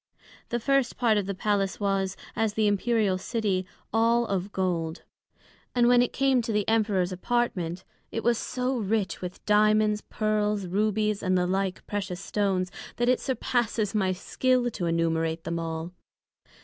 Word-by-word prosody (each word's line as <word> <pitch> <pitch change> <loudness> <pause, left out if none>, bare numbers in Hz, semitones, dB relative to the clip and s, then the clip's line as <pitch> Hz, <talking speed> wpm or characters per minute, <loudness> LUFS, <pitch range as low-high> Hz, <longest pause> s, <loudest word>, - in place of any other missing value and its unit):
The 240 - -1
first 275 0 +1
part 225 -4 +3
of 195 - -3
the 200 - -2
Palace 195 0 0
was, 195 -2 0 0.2
as 220 -2 0
the 220 - +2
Imperial 205 -2 +2
City, 195 -3 -1 0.3
all 230 +1 +3
of 195 -1 -2
Gold; 175 -4 -2 0.7
and 240 -1 +4
when 245 0 +6
it 245 - +1
came 270 -2 +2
to 230 - -3
the 210 -2 0
Emperors 210 -5 +2
appartment, 185 -4 -1 0.3
it 225 - -3
was 235 -1 +2
so 255 0 -2
rich 205 -3 -1
with 180 0 -7
Diamonds, 215 0 +3
Pearls, 210 -2 -1
Rubies, 210 +2 0
and 185 -1 +2
the 180 - +2
like 190 0 -1
precious 195 -3 -3
Stones, 195 -2 -1 0.2
that 240 +1 +1
it 255 - +3
surpasses 240 -5 -1
my 195 -3 +1
skill 245 +6 +1
to 180 -5 -3
enumerate 165 -1 0
them 170 0 -2
all. 165 +1 -4
210 Hz, 160 wpm, -27 LUFS, 185-230 Hz, 0.7 s, when